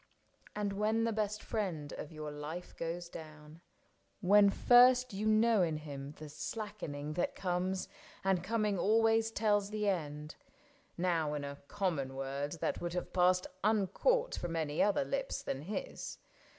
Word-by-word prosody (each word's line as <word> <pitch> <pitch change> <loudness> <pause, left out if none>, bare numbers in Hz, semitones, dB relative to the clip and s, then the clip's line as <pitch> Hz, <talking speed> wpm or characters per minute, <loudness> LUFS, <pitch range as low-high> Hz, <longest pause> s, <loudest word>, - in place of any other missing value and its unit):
And 205 -1 -1
when 215 +3 +1
the 230 0 +1
best 210 0 -2
friend 175 -10 -3
of 150 - -7
your 155 -1 -6
life 150 +4 -7
goes 170 +1 -4
down, 155 -1 -11 0.6
When 200 +1 +6
first 250 +2 +6
you 205 +3 -1
know 215 0 +4
in 160 -3 +1
him 145 -2 -7
the 155 0 -10
slackening 150 -4 -5
That 175 - -1
comes, 185 0 -1 0.4
and 190 -3 +2
coming 210 -1 0
always 225 +3 +3
tells 205 -2 +1
the 210 0 -1
end, 150 -5 -2 0.3
— - - -31 0.2
Now 165 -4 +1
in 145 - -3
a 140 0 -7
common 165 -10 -1
word 135 +2 -3
that 165 - -2
would 175 -1 -3
have 180 - -4
passed 180 0 +4 0.2
Uncaught 220 - +2
from 170 -1 -3
any 155 -2 0
other 210 +7 +3
lips - - -2
than 135 - -3
his. 210 - -5
185 Hz, 155 wpm, -33 LUFS, 155-215 Hz, 0.6 s, When